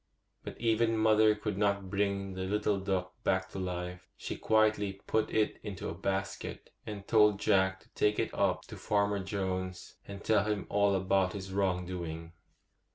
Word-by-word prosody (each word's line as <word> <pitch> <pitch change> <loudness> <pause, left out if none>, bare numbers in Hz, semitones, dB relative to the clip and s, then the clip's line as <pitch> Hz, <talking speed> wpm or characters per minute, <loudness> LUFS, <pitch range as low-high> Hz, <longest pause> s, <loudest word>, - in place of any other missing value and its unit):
But - - -8
even 115 0 +2
mother 110 0 +5
could 105 -2 -3
not 100 -2 +1
bring 100 -1 -1
the 95 0 -3
little 105 0 +1
duck 95 -1 -2
back 95 0 +1
to 95 - -5
life. 90 -1 -5
She - - -5
quietly 110 -2 +2
put 110 -1 +1
it 110 -1 +1
into 100 -2 -5
a - - -4
basket, 95 +2 -4 0.2
and 100 -2 -6
told 105 -3 +5
Jack 95 -2 +2
to - - -23
take 105 0 +1
it - - -1
up - - +1
to - - -10
Farmer 100 -1 +1
Jones, 95 -1 -4
and 100 0 -8
tell 105 -2 +3
him 105 -2 -1
all 100 -1 +3
about 95 -1 +2
his 95 -1 -6
wrong 95 -2 +1
doing. 85 -2 -6
100 Hz, 170 wpm, -31 LUFS, 95-105 Hz, 0.2 s, mother